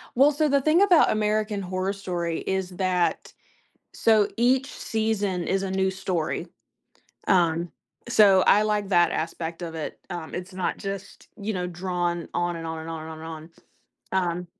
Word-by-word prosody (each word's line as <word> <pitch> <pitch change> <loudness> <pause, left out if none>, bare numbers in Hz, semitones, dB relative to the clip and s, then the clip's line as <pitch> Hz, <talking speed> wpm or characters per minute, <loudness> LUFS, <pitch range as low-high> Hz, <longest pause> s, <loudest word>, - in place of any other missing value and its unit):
Well, 280 +4 +6
so, 305 +1 +1
the 280 -1 +3
thing 315 +6 +4
about 365 -5 +5
American 215 -1 0
Horror 185 +1 -2
Story 175 -4 -3
is 190 -1 -2
that 185 -2 0 0.6
so, 215 -2 +4
each 255 +3 +3
season 205 -5 -1
is 195 0 0
a 190 - -3
new 190 0 +1
story. 180 -4 -2 0.8
Um, 170 -2 +2 0.4
so, 200 -5 +6
I 210 - +6
like 210 -2 0
that 175 -1 +4
aspect 165 +1 -4
of 165 -1 -5
it, 160 - -5
um, 170 -2 -6
it's 185 +1 -6
not 185 - -2
just, 195 -1 -7
you 215 +1 -3
know, 180 -2 -2
drawn 175 -1 -2
on 175 0 0
and 165 0 -6
on 160 0 -4
and 160 - -8
on 160 -1 -5
and 160 - -8
on 160 - -8
and - - -8
on. 160 +1 -10 0.8
Um 175 +1 -5
185 Hz, 175 wpm, -25 LUFS, 175-210 Hz, 0.8 s, Well